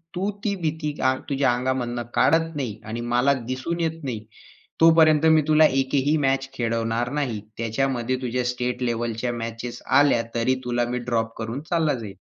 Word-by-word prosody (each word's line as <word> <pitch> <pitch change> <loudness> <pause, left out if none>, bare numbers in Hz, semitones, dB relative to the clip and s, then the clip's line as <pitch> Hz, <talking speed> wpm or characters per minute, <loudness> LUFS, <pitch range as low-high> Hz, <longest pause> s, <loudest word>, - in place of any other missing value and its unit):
तू 190 +3 -1
ती 205 -3 0
भीती 155 -2 -2 0.2
आंग 130 0 -1
तुझ्या 135 -3 +2
अंगामधनं 125 -1 -2
काढत 165 0 +2
नाही 120 -7 -4
आणि 115 +2 -4
मला 130 +3 +4 0.2
दिसून 150 +7 -3
येत 165 -1 -2
नाही. 115 -5 -4 0.6
तोपर्यंत 160 -2 +6
मी 155 - +5
तुला 155 0 +6
एकही 135 +2 +1
मॅच 135 0 0
खेळवणार 115 0 -1
नाही. 120 -7 -2 0.2
त्याच्यामध्ये 120 +2 -1
तुझ्या 125 0 -1
स्टेट 125 0 -2
लेव्हलच्या 120 0 -2
मॅचेस 115 +1 -6
आल्या, 140 -3 +4
तरी 120 +3 +2
तुला 120 -1 0
मी 125 - -1
ड्रॉप 115 -1 -1
करून 115 +4 -4
चालला 165 -3 +2
जाईल. 110 -6 -6
125 Hz, 160 wpm, -24 LUFS, 120-145 Hz, 0.6 s, तोपर्यंत